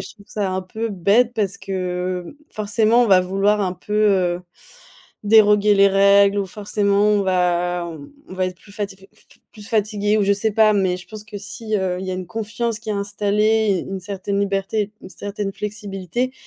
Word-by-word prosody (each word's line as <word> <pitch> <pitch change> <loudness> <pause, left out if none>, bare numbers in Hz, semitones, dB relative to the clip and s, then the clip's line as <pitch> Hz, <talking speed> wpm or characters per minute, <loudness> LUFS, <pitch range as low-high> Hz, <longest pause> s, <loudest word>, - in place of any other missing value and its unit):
je - - -9
trouve 200 -2 -19
ça 205 -3 -2
un 185 0 -1
peu 220 +5 -4
bête 210 +5 +2
parce 200 -3 -1
que, 195 0 -11 0.6
heu, 290 - -12
forcément 220 +3 +2
on - - 0
va 190 -3 +6
vouloir 195 +3 +1
un 185 -2 0
peu, 210 +3 -10
heu, 185 -4 +2 0.8
déroger 210 -1 +5
les 200 0 +6
règles 200 +1 +4
ou 195 - -1
forcément 200 +1 0
on 210 -1 +3
va 180 -1 0
on 160 -4 -9 0.2
on 185 - -9
va 185 0 0
être 180 -1 -6
plus 200 - -16
fati 200 -2 -4
f 195 - -18
f - - -22 0.3
plus 210 -2 -11
fatigué 210 -1 0
ou 205 - +2
je 200 - +3
sais 205 +2 0
pas, 215 0 +5
mais 190 -3 +1
je 180 - -11
pense 215 -1 -9
que 210 -1 -8
si, 215 +2 -6
heu, 185 -2 -1
il 190 - -5
y - - -3
a - - -2
une 185 -1 -5
confiance 225 +2 -3
qui 220 - -6
est - - +1
installée, 205 0 +1
u - - -8
une 190 - -4
certaine 200 +1 -4
liberté, 200 +1 -1
une - - -11
certaine 200 0 -5
flexibilité, 210 +3 -4
200 Hz, 210 wpm, -21 LUFS, 190-210 Hz, 0.8 s, va